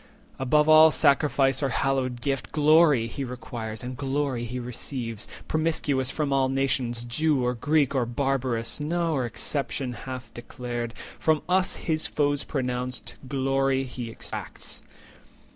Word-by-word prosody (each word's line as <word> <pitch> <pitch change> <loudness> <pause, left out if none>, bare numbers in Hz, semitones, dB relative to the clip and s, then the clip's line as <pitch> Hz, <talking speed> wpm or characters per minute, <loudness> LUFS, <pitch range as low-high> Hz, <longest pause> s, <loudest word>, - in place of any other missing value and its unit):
Above 150 +4 +3
all 155 0 +9
sacrifice, 140 -3 +3
or 140 - +1
hallowed 130 -2 0
gift, 135 0 -2
Glory 150 -4 +5
he 125 +4 -5
requires, 120 -3 -6
and 125 0 -5
glory 135 -3 -1
he 125 +2 -4
receives, 120 -2 -5 0.2
Promiscuous 150 -5 0
from 145 -3 -1
all 135 -1 +3
nations, 130 -3 0
Jew, 130 +2 +1
or 125 - +1
Greek, 145 +3 +1
Or 125 -4 +1
Barbarous, 130 -2 -1
nor 155 -4 0
exception 135 0 -2
hath 125 -1 -7
declared; 120 -1 -5 0.2
From 155 -2 +2
us, 185 +1 +2
his 155 -1 -1
foes 145 -1 +1
pronounced, 125 -2 -3
glory 135 0 +1
he 125 -2 -6
exacts." 115 - -6
135 Hz, 130 wpm, -26 LUFS, 125-145 Hz, 0.2 s, all